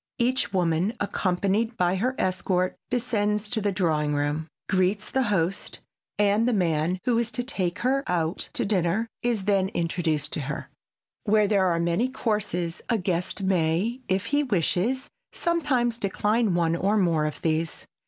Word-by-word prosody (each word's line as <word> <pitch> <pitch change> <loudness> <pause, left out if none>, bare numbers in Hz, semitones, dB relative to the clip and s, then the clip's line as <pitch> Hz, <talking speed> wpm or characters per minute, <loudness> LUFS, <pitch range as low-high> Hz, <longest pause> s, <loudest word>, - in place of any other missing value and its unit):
Each 255 0 +1
woman, 180 +3 +1
accompanied 200 +4 0
by 180 +1 +2
her 255 +7 0
escort, 185 0 0
descends 210 -4 0
to 225 -3 0
the 205 0 +1
drawing 155 -6 +1
room, 145 +2 -1 0.2
greets 190 +2 +1
the 265 - +2
hosts, 190 -1 -1 0.4
and 210 +3 +3
the 250 - +2
man 175 -2 +1
who 240 -2 +3
is 235 -1 0
to 245 +1 -3
take 185 -9 -1
her 270 +2 +2
out 170 -1 -1
to - - 0
dinner 195 +1 +1 0.2
is 235 -5 0
then 195 -2 +2
introduced 165 -3 -1
to - - -2
her. 150 +1 -5 0.5
Where 210 -1 +4
there 195 -2 +3
are 170 -1 +1
many 170 +9 +1
courses 205 -9 -2
a 230 - +3
guest 180 0 -2
may, 190 +6 +1
if 190 +3 0
he 290 +5 +2
wish, 200 - +1 0.6
sometimes 265 -9 +1
decline 210 0 +1
one 170 -1 +2
or 200 +5 +1
more 165 -6 +2
of 150 - -6
these. 160 0 -1
195 Hz, 160 wpm, -26 LUFS, 170-225 Hz, 0.6 s, Where